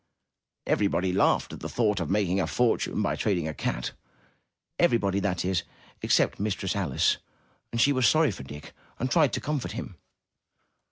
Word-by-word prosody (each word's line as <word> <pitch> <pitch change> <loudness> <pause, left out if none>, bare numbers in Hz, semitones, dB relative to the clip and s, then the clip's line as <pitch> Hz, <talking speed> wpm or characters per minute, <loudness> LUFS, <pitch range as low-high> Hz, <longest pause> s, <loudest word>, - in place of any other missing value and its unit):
Everybody 95 -3 +1
laughed 95 - +2
at - - -8
the - - -6
thought 105 -4 +1
of 85 -3 -3
making 95 -1 +1
a 90 - 0
fortune 110 +4 +1
by 100 - 0
trading 90 -7 0
a 80 - -3
cat - - -3 0.4
— - - -50
everybody, 100 -4 +2
that 90 -3 -1
is, 95 -2 +1 0.4
except - - +2
Mistress 100 -2 -1
Alice, 90 -10 +1 0.5
and 115 - -2
she 140 +4 +5
was 130 -2 +3
sorry 155 -4 +4
for 95 - -8
Dick 75 +2 -10 0.2
and 130 +2 -2
tried 155 -7 +4
to - - 0
comfort 150 -4 -3
him. - - -7
100 Hz, 170 wpm, -27 LUFS, 90-115 Hz, 0.5 s, she